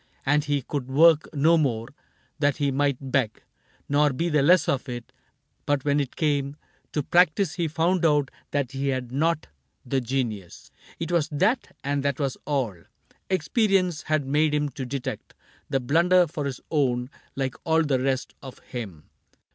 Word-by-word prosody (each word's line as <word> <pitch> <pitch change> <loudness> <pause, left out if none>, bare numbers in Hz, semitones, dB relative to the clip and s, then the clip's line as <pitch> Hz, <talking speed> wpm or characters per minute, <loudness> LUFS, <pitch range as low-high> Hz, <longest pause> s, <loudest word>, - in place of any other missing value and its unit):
And 145 +2 +2
he 145 -2 0
could 140 -2 -4
work 160 +3 +5
no 160 +3 +4
more, 115 -6 -1 0.5
that 145 -1 +2
he 140 -2 +1
might 135 -1 -1
beg 125 -6 0 0.4
Nor 145 0 +3
be 170 +6 -1
the 150 -3 +3
less 170 +3 +5
for 140 - +1
it; 120 -2 -7 0.5
but 145 -2 +1
when 145 0 +2
it 140 -3 -3
came 145 -2 0 0.4
To 150 - 0
practice 175 +2 +3
he 170 -2 -1
found 170 +3 +1
out 150 -4 +3 0.2
that 140 -3 -1
he 135 +1 -3
had 130 -3 -2
not 155 +3 0 0.4
The 130 +1 0
genius. 115 -7 -4 0.3
It 165 +1 -3
was 165 -3 +1
that, 220 - 0
and 140 0 0
that 140 -1 -1
was 135 -3 -1
all: 135 -9 -1 0.5
Experience 185 -1 +1
had 155 -2 0
made 150 +2 +2
him 145 0 0
to 130 -1 -6
detect 130 0 -5 0.3
The 135 - +1
blunder 170 +8 +4
for 150 -2 -5
his 135 -2 -4
own, 125 -4 0 0.2
like 135 -2 -2
all 160 0 +3
the 140 -4 +1
rest 130 0 -1
Of 130 -2 -10
him. 100 -11 -8
145 Hz, 170 wpm, -25 LUFS, 130-155 Hz, 0.5 s, work